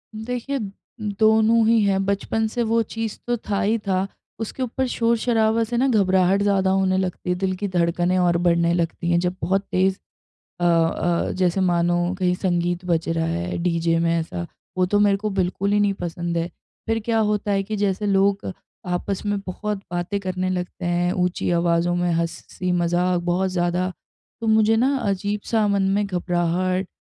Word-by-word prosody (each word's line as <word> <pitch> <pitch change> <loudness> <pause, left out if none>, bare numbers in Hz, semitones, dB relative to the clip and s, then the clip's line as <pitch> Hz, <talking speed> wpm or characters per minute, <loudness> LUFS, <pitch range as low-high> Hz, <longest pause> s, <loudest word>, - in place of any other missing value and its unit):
देखिए, 250 +5 -3 0.4
दोनों 220 +2 +3
ही 230 -1 +4
है। 200 -1 +2
बचपन 200 +3 0
से 235 +2 -2
वो 230 0 +2
चीज़ 225 0 -5
तो 240 0 +1
था 200 - +1
ही 220 +3 +2
था। 190 0 +1 0.3
उसके 225 +4 -4
ऊपर 255 +1 -2
शोर-शराबा 230 -1 +1
से 235 +2 -3
ना 265 +3 +3
घबराहट 190 -4 +3
ज़्यादा 195 -2 +2
होने 190 -1 +2
लगती 185 -1 -3
है। 180 - +2
दिल 185 0 -1
की 205 +2 -3
धड़कनें 175 0 +1
और 175 -1 +3
बढ़ने 170 -1 +2
लगती 170 0 -1
हैं 170 - +3
जब 180 +1 -1
बहुत 195 +2 +1
तेज़ 190 +1 +2 0.7
अ - - +1
अ, 170 0 +2
जैसे 185 0 +1
मानो 175 0 +1
कहीं 180 -1 +2
संगीत 175 -1 -1
बज 170 -2 0
रहा 165 0 0
है 175 +2 -2
डीजे 170 -1 +1
में 165 0 +1
ऐसा, 170 +1 -4 0.3
वो 185 - +4
तो 205 +3 +1
मेरे 205 -1 +4
को 210 +2 -3
बिल्कुल 195 +1 -1
ही 205 - +3
नहीं 205 -1 +3
पसंद 170 0 -3
है। 170 0 -1 0.4
फ़िर 225 0 +1
क्या 225 -1 +1
होता 210 -1 0
है 195 0 +1
कि 215 +2 -4
जैसे 205 0 0
लोग 195 0 +2 0.4
आपस 180 +3 -2
में 205 0 0
बहुत 210 +3 -3
बातें 175 +3 -2
करने 185 -1 -2
लगते 180 -1 -4
हैं 175 +1 +1
ऊँची 180 -1 -1
आवाज़ों 170 0 +1
में, 175 0 0
हँसी-मज़ाक 175 +1 -1
बहुत 180 +2 0
ज़्यादा, 180 +1 0 0.5
तो 230 - -3
मुझे 220 0 +4
ना 265 +5 +2
अजीब-सा 205 +1 -1
मन 200 -1 +2
में 205 0 +1
घबराहट, 180 0 0
185 Hz, 180 wpm, -22 LUFS, 175-210 Hz, 0.7 s, ही